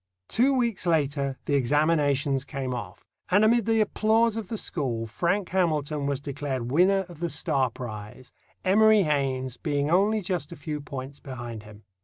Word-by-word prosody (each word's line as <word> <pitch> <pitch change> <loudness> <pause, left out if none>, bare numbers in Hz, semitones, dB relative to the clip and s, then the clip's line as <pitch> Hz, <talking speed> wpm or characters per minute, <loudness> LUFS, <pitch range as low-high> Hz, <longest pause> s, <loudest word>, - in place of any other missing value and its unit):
Two 265 +4 +2
weeks 235 -7 0
later 140 -4 0
the 145 - -1
examinations 145 0 +2
came 135 -2 -4
off, 120 -4 -7 0.2
and 205 +3 +5
amid 230 0 +3
the 225 -1 +3
applause 220 +2 +2
of 225 -4 -4
the 225 - -4
school 125 - -2
Frank 175 - -1
Hamilton 155 -5 0
was 140 -2 -1
declared 140 -4 -4
winner 190 +5 +3
of 175 -4 -13
the 170 0 -1
Starr 135 -3 0
prize, 110 +1 -8 0.3
Emory 215 +2 +5
Haynes 135 -5 -1
being 145 0 -1
only 205 +4 +3
just 180 -4 -3
a - - -7
few 150 -3 -5
points 135 0 -7
behind 120 -4 -7
him. 105 0 -14
150 Hz, 165 wpm, -26 LUFS, 130-190 Hz, 0.3 s, and